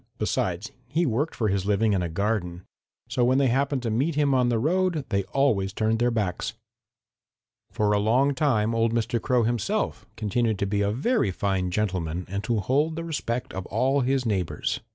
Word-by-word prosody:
Besides, 100 -2 -1 0.2
he 160 +7 +1
worked 140 +5 -1
for 110 -3 0
his 95 0 -1
living 105 +1 +2
in 95 - +1
a 85 - -2
garden. 90 -1 -2 0.4
So 120 +1 0
when 130 +2 +3
they 135 -2 +3
happened 135 +1 0
to 115 - -1
meet 140 +8 0
him 145 -2 +2
on 125 -2 +3
the 120 - +1
road 165 +3 +1
they 100 -1 0
always 100 -4 +1
turned 110 +1 0
their 120 +1 +3
backs. 105 -6 -2 1.2
"For 105 -1 0
a 105 - +3
long 125 +7 +3
time 120 -6 +1
old 115 0 +1
Mr. 115 0 0
Crow 125 -2 +2
himself 115 -1 -1
continued 110 +1 0
to 100 - -1
be 100 +1 0
a 100 - +2
very 135 - +1
fine 95 -1 -1
gentleman 90 -3 -2
and 100 +1 -2
to 115 -3 0
hold 145 +8 +1
the 165 - -4
respect 125 -7 -3
of 95 -1 -5
all 130 +6 +1
his 130 0 +1
neighbors. 95 -6 -1
115 Hz, 195 wpm, -26 LUFS, 100-130 Hz, 1.2 s, when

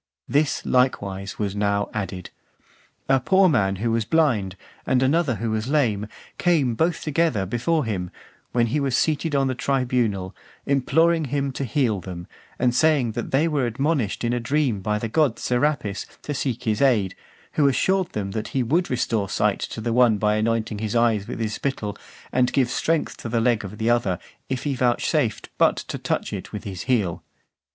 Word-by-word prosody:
This, 145 +1 +1
likewise, 100 -7 0
was 100 -2 -2
now 100 0 +1
added. 95 -3 -4 0.8
A 135 0 +4
poor 190 +9 +4
man 100 - +2
who 115 +4 -1
was 115 0 +1
blind, 110 - +1 0.3
and 130 0 +2
another 140 -1 +2
who 110 +2 -2
was 110 +1 -2
lame, 115 -8 +1 0.3
came 155 -9 +2
both 160 +7 0
together 150 -9 +1
before 125 - 0
him, 95 -5 -3 0.4
when 120 -1 +2
he 150 - +2
was 135 -3 +1
seated 155 0 0
on 135 -1 +3
the 130 - 0
tribunal, 120 -8 0 0.3
imploring 160 +4 +2
him 140 0 -1
to 135 - -4
heal 120 -4 +1
them, 90 -1 -7 0.3
and 125 -1 +2
saying 140 -3 +3
that 115 +2 -4
they 145 +5 +2
were 145 -6 0
admonished 135 -2 -1
(450) - - -1
in 120 - +1
a 120 - 0
dream 130 -5 +1
by 105 +1 0
the 115 - -3
god 140 0 +2
Serapis 125 -6 -1 0.2
to 145 - -3
seek 125 -3 -2
his 110 -1 0
aid, 110 -9 +3 0.4
who 145 - +3
assured 190 +7 +2
them 100 -2 -3
that 110 +1 -3
he 130 - +2
would 165 +9 +1
restore 115 -5 0
sight 105 0 +1
to - - -5
the 115 +1 -1
one 120 -3 +4
by 105 +1 +2
anointing 110 -1 0
his 110 +1 -3
eyes 115 -4 +2
with - - -5
his 110 -2 -2
spittle, 110 -7 -3 0.4
and 125 0 +2
give 130 -3 +2
strength 160 +3 0
to 115 - -6
the 115 +1 +1
leg 115 -2 +2
of 100 +2 -8
the 110 +2 +1
other, 110 -7 +1 0.3
if 130 -2 -2
he 145 - -1
vouchsafed 125 -2 0
but - - +5
to - - -5
touch - - -2
it - - -6
with - - -6
his 95 -3 -6
heel. 105 -10 0
120 Hz, 190 wpm, -23 LUFS, 105-140 Hz, 0.8 s, but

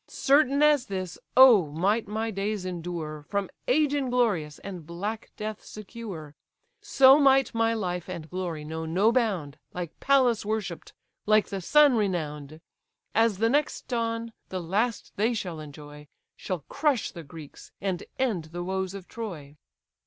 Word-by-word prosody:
Certain 280 +1 +3
as 295 -4 +4
this, 185 -3 -5 0.2
oh! 240 -10 +8
might 195 +9 0
my 220 +2 -2
days 200 -1 -3
endure, 170 -4 -5
From 200 -2 -2 0.2
age 290 +2 +3
inglorious, 240 - 0
and 185 -4 -8
black 200 +8 -5
death 215 0 -5
secure; 200 -8 -8 0.5
So 275 -9 +6
might 270 -2 +4
my 230 0 +1
life 180 -4 -3
and 170 -4 -6
glory 170 -4 -4
know 160 +1 -5
no 190 +7 +3
bound, 195 - -1 0.2
Like 175 -3 -6
Pallas 260 -5 +3
worshipp'd, 205 -5 -4 0.3
like 215 0 +4
the 195 -1 -4
sun 290 - +5
renown'd! 155 -6 -3 0.5
As 225 -2 +3
the 225 +3 +2
next 290 +4 0
dawn, 230 -1 -2 0.2
the 185 - -3
last 205 +7 -1
they 225 +4 +1
shall 180 -7 -4
enjoy, 150 0 -11 0.3
Shall 185 -4 -4
crush 280 -5 0
the 170 - -9
Greeks, 150 -1 -12
and 190 -3 -2
end 225 -11 0
the 175 +2 -6
woes 190 +1 -3
of 190 -2 -9
Troy." 165 -11 -7
200 Hz, 150 wpm, -27 LUFS, 170-230 Hz, 0.5 s, oh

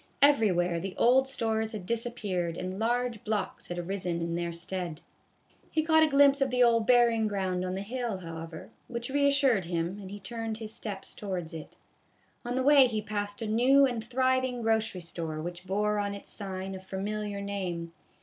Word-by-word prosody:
Everywhere 185 -11 +4
the 185 +2 -6
old 260 +3 +5
stores 220 -4 -1
had 205 -4 -6
disappeared 205 -7 -2
and 185 +2 -4
large 240 -1 0
blocks 215 -1 -2
had 175 - -5
arisen 175 -1 -2
in 170 0 -2
their 170 0 -2
stead. 170 -1 -4 0.7
He 315 - +1
caught 315 0 +5
a 315 - +6
glimpse 280 -1 +5
of 270 - +3
the 250 0 +3
old 230 -2 +3
burying 235 -3 +4
ground 190 -3 -1
on 185 0 -2
the 195 - -3
hill, 235 -1 -3
however, 165 -2 -8 0.2
which 235 +1 -5
reassured 280 - +3
him, 170 +3 -2
and 190 - -8
he 205 +1 -7
turned 225 +2 -4
his 220 -1 -7
steps 200 -3 -5
towards 180 -5 -5
it. 160 -2 -9 0.7
On 245 0 -3
the 260 - +1
way 280 -1 +7
he 220 -3 -2
passed 205 +1 -4
a - - -2
new 255 +6 +5
and 240 -4 -2
thriving 255 0 +1
grocery 220 -4 +1
store 165 -2 -5
which 175 +3 -6
bore 210 +2 +1
on 200 0 -2
its 200 - -10
sign 190 -2 -5
a 190 - -6
familiar 200 +2 -4
name. 180 -4 -4
210 Hz, 185 wpm, -29 LUFS, 185-240 Hz, 0.7 s, way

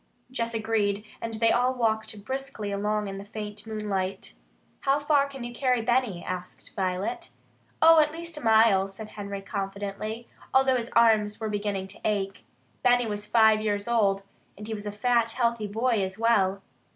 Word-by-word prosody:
Jess 230 -2 -2
agreed, 215 -2 0 0.2
and 230 -1 -4
they 225 +1 +3
all 250 +1 +2
walked 220 -3 -1
briskly 265 -6 -4
along 210 +1 -1
in 195 0 -5
the - - -7
faint 210 0 -7
moonlight. 195 - -3 0.5
"How 275 +1 +2
far 290 -1 +2
can 270 -3 -8
you 240 0 -6
carry 250 -2 +1
Benny?" 240 -6 +1
asked 180 0 -7
Violet. 195 - -2 0.5
"Oh, 325 0 +8
at 300 -1 +3
least 335 +1 -7
a 300 - -6
mile," 220 -4 +5
said 210 +2 -9
Henry 200 -2 -6
confidently, 200 +3 -4 0.3
although 265 -1 +5
his 235 -1 -4
arms 220 -3 +4
were 220 -1 -3
beginning 205 -2 -2
to 195 - -9
ache. 200 -2 -1 0.4
Benny 245 -1 +4
was 210 -1 -4
five 220 -1 +5
years 205 -1 -1
old, 200 -4 +2 0.3
and 210 - -8
he 225 - -3
was 210 -1 -6
a - - -2
fat, 230 +2 +1
healthy 235 -3 0
boy 225 +1 +1
as 190 +1 -4
well. 200 -4 +2
220 Hz, 175 wpm, -27 LUFS, 200-240 Hz, 0.5 s, Oh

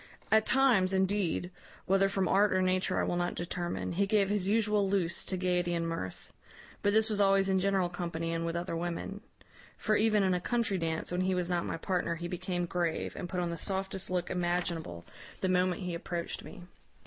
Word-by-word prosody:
At 220 0 +4
times, 240 -9 +4
indeed, 190 -2 0 0.3
whether 195 +1 +3
from 195 -1 0
art 200 +3 +4
or 185 0 +2
nature 185 0 +1
I - - +2
will 175 - -1
not 175 0 -1
determine, 175 0 -3
he 195 +3 +1
gave 200 -1 +3
his 200 -2 0
usual 210 -2 +2
loose 180 -4 0
to 185 - -2
gaiety 180 -1 0
and 165 0 -1
mirth; 130 - -5 0.5
but 205 - +2
this 220 +1 +3
was 210 -2 0
always 195 -1 +4
in 190 0 +3
general 190 -1 +2
company, 170 -2 -3
and 165 0 -1
with 165 0 -2
other 170 0 -2
women; 175 +4 -4 0.6
for 215 - +1
even 210 -1 +3
in 190 -1 +2
a 180 - 0
country 230 -3 0
dance, 165 0 -2
when 180 +1 0
he 185 0 +1
was 180 0 -1
not 175 -1 0
my - - -3
partner, 175 -1 -1
he 175 +1 -5
became 180 0 -2
grave, 170 -1 -2
and 175 - -5
put 180 -1 -1
on 175 -1 -1
the 170 - -4
softest 190 +1 -3
look 180 -1 -1
imaginable 175 - -2 0.4
the 190 - +1
moment 185 0 +1
he 180 -1 -3
approached 170 0 -4
me. 185 -4 -10
185 Hz, 205 wpm, -31 LUFS, 175-195 Hz, 0.6 s, At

